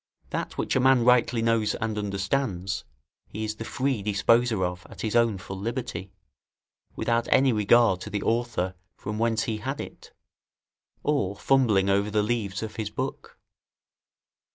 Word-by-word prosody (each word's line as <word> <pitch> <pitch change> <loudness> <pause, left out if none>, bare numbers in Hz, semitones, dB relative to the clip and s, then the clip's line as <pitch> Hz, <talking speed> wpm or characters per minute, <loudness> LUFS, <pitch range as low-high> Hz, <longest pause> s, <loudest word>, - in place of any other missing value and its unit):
That - - -4
which - - -1
a - - +4
man 130 -2 +4
rightly 125 -1 +4
knows 115 -2 +2
and 110 -1 -2
understands, 100 - -2 0.4
he 110 - -6
is 110 0 -3
the - - -5
free 130 -1 -1
disposer 105 +1 +2
of 90 0 -4
at - - -10
his 110 0 -2
own 115 -4 +3
full 95 +1 -7
liberty, 105 -5 -4 0.8
without 115 0 0
any 130 -1 +5
regard 105 -2 +4
to - - -6
the 105 -1 -3
author 115 -6 0 0.2
from 105 +1 -5
whence 115 -1 +1
he 110 -2 -2
had 135 +6 -4
it, - - -9 0.9
or 140 -10 0
fumbling 110 -7 +3
over 100 +1 +2
the 105 0 +1
leaves 105 -3 -2
of 110 - -6
his 110 -2 -2
book. 130 +5 -5
110 Hz, 155 wpm, -26 LUFS, 100-120 Hz, 0.9 s, any